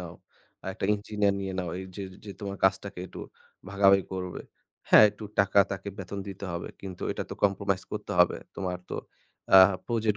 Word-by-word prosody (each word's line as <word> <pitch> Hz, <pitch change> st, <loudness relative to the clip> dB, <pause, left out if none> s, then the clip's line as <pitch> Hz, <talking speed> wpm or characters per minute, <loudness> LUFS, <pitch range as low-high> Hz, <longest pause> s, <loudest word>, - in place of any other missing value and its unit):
নাও, -, -, -8 dB, 0.6 s
একটা 95 Hz, -, -5 dB
engineer 105 Hz, -1 st, 0 dB
নিয়ে 95 Hz, -1 st, -3 dB
নাও। 90 Hz, -2 st, -2 dB
এইযে 95 Hz, +1 st, -7 dB, 0.2 s
যে, 105 Hz, -, -7 dB
তোমার 100 Hz, -1 st, -5 dB
কাজটাকে 95 Hz, -1 st, +1 dB
একটু -, -, -11 dB, 0.5 s
ভাগাভাগি 100 Hz, -1 st, +5 dB
করবে। 90 Hz, -1 st, -4 dB, 0.5 s
হ্যাঁ, -, -, +9 dB
একটু 105 Hz, +1 st, -10 dB
টাকা 100 Hz, 0 st, +4 dB
তাকে 95 Hz, +1 st, -5 dB
বেতন 95 Hz, +1 st, -6 dB
দিতে 100 Hz, 0 st, -7 dB
হবে 85 Hz, 0 st, -4 dB
কিন্তু 95 Hz, -2 st, -8 dB
এটা -, -, -4 dB
তো -, -, -4 dB
compromise 100 Hz, -1 st, +1 dB
করতে 105 Hz, -1 st, -4 dB
হবে। 90 Hz, 0 st, +5 dB, 0.2 s
তোমার 90 Hz, -2 st, -3 dB
তো -, -, -3 dB, 0.6 s
আ -, -, +12 dB, 0.3 s
project 110 Hz, -3 st, 0 dB
100 Hz, 170 wpm, -28 LUFS, 95-100 Hz, 0.6 s, আ